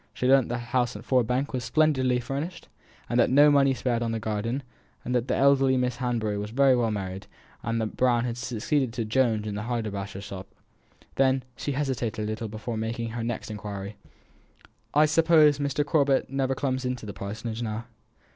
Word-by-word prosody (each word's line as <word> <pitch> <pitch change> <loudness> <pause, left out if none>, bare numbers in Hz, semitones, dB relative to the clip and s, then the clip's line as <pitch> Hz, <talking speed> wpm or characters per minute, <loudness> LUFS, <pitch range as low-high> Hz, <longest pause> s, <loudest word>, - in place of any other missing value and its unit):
She - - -2
learnt 135 -1 +5
that 120 - -1
the - - -3
house 120 0 -1
at 105 +3 -9
Ford 125 -4 +2
Bank 130 +4 -1
was 125 -1 -2
splendidly 130 -5 +2
furnished, 140 +8 -5 0.4
and 120 +1 +2
no 145 +1 +7
money 135 -2 +4
spared 120 -2 -1
on 115 -1 -1
the 115 - -2
garden; 110 +5 -2 0.4
that 125 0 0
the - - +1
eldest 135 -1 +4
Miss 125 -1 -1
Hanbury 115 -5 -1
was 105 +1 -4
very 135 +2 +4
well 120 -2 +1
married; 95 -2 -4 0.4
that 115 -1 -2
Brown 125 -1 +3
had 120 -2 -2
succeeded 125 +1 -1
to 115 -2 -2
Jones 110 -2 +1
in 105 - -3
the 100 - -3
haberdasher's 105 -4 -4
shop. 95 -1 -8 0.7
Then 130 -1 +3
she 145 - -3
hesitated 130 -6 -2
a - - -2
little 110 +1 -3
before 110 +2 -5
making 115 +1 -3
her 115 0 -4
next 115 -1 -4
inquiry: 100 -1 -6 1.0
"I 150 +2 +5
suppose 155 -2 +5
Mr. 145 0 0
Corbet 140 -4 +2
never 135 -1 0
comes 130 -1 -1
to 125 -3 -3
the 100 - -6
Parsonage 110 +4 -5
now?" 110 0 -3
120 Hz, 185 wpm, -26 LUFS, 110-135 Hz, 1.0 s, no